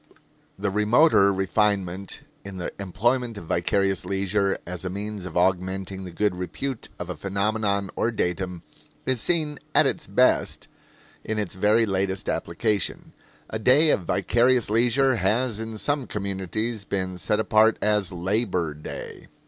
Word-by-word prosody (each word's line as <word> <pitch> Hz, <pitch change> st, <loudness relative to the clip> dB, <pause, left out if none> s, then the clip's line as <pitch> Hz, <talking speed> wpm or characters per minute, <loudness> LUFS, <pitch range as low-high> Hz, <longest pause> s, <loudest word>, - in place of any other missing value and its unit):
The 100 Hz, 0 st, -1 dB
remoter 105 Hz, +1 st, +4 dB
refinement 95 Hz, -1 st, 0 dB, 0.2 s
in 100 Hz, -1 st, -8 dB
the 90 Hz, -, -4 dB
employment 115 Hz, +5 st, 0 dB
of 100 Hz, -, -8 dB
vicarious 95 Hz, +3 st, +1 dB
leisure 100 Hz, +1 st, 0 dB
as 90 Hz, 0 st, -6 dB
a 95 Hz, -, -3 dB
means 100 Hz, 0 st, -5 dB
of 90 Hz, -, -5 dB
augmenting 95 Hz, +1 st, 0 dB
the -, -, -6 dB
good 100 Hz, +2 st, 0 dB
repute 110 Hz, +8 st, -5 dB
of -, -, -6 dB
a -, -, -5 dB
phenomenon 100 Hz, 0 st, -1 dB
or 115 Hz, -, +1 dB
datum 90 Hz, -4 st, -2 dB, 0.4 s
is 130 Hz, -3 st, +1 dB
seen 155 Hz, -4 st, 0 dB, 0.2 s
at -, -, +6 dB
its -, -, -1 dB
best -, -, +2 dB, 0.6 s
in 110 Hz, -, -3 dB
its 105 Hz, -4 st, -2 dB
very 105 Hz, +4 st, +3 dB
latest 95 Hz, -1 st, -1 dB
application. 100 Hz, +4 st, -1 dB, 0.4 s
A 110 Hz, -, -2 dB
day 145 Hz, +7 st, +5 dB
of -, -, +3 dB
vicarious 120 Hz, +6 st, +2 dB
leisure 125 Hz, +3 st, +3 dB
has 110 Hz, +4 st, 0 dB
in 110 Hz, -1 st, -5 dB
some 145 Hz, +3 st, -1 dB
communities 100 Hz, +3 st, -3 dB
been 95 Hz, -2 st, -3 dB
set 105 Hz, +2 st, +1 dB
apart 110 Hz, +1 st, +4 dB
as 105 Hz, -3 st, +1 dB
Labor 90 Hz, -2 st, -1 dB
Day. 75 Hz, +1 st, -8 dB
100 Hz, 145 wpm, -25 LUFS, 95-110 Hz, 0.6 s, at